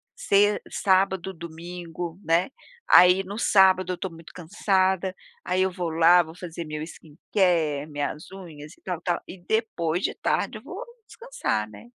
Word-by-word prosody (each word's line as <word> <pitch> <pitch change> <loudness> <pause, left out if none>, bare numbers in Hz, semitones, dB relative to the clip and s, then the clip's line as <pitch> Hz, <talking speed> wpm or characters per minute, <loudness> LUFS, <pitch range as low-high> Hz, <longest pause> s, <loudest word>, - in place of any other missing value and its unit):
se 205 - +3
sábado, 190 -1 +1
domingo 170 +1 -7
né, 170 +7 +2 0.4
aí 180 +2 +7
no 200 +3 -7
sábado 190 -4 +4
eu - - -1
estou 190 +1 -5
muito 165 0 -14
cansada, 190 +1 0 0.3
aí 185 +1 0
eu 190 0 +2
vou 175 -2 -3
lá 170 +2 +5
vou 160 +1 -12
fazer 170 -2 -7
meu 155 0 -5
skin-care, 160 -1 -1
minhas 145 +2 -5
unhas 165 -5 -11
e - - -24
tal 180 -3 -4
tal, 175 -1 -1
e 190 - -9
depois 180 -6 -1
de - - 0
tarde - - -1
eu - - -14
vou - - -7 0.2
descansar, 470 - -3
né. 170 - -13
180 Hz, 160 wpm, -25 LUFS, 165-190 Hz, 0.4 s, aí